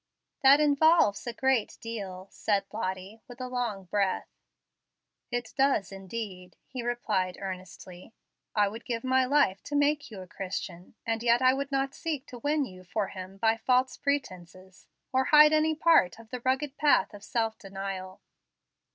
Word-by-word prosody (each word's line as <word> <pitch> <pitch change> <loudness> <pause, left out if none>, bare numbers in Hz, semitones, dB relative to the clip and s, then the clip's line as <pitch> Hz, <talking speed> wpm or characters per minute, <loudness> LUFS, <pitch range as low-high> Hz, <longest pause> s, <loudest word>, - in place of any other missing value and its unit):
"That 275 +2 +7
involves 300 -7 +4
a - - -1
great 265 -2 +1
deal," 195 -5 -6
said 200 -2 0
Lottie, 195 +1 -4
with 245 0 -12
a 255 - -4
long 240 -6 -3
breath. 190 +1 -1 1.0
"It 245 0 -4
does 270 -9 +2
indeed," 195 -2 -7
he 255 -2 -6
replied 215 -7 -1
earnestly. 185 0 -8 0.4
"I 205 -1 +4
would 225 +4 -7
give 230 -2 -3
my 260 0 +3
life 255 -8 +2
to 290 - -4
make 290 +1 +2
you 205 -4 -9
a - - -8
Christian, 185 -1 -6
and 225 0 -1
yet 235 0 +4
I 255 0 +6
would 280 +1 -3
not 270 0 0
seek 300 -5 -4
to 245 - -9
win 290 +3 +1
you 185 -5 -12
for 195 +2 -2
Him 185 +1 -9
by 225 +2 +2
false 255 +3 +2
pretences, 190 -9 -4 0.3
or 260 0 +3
hide 300 +1 +7
any 310 0 +3
part 315 - +4
of 230 0 -15
the 250 -1 -5
rugged 265 +2 0
path 295 -6 +3
of 205 0 -11
self 225 -2 -1
denial. 195 -1 -6
230 Hz, 165 wpm, -28 LUFS, 195-265 Hz, 1.0 s, That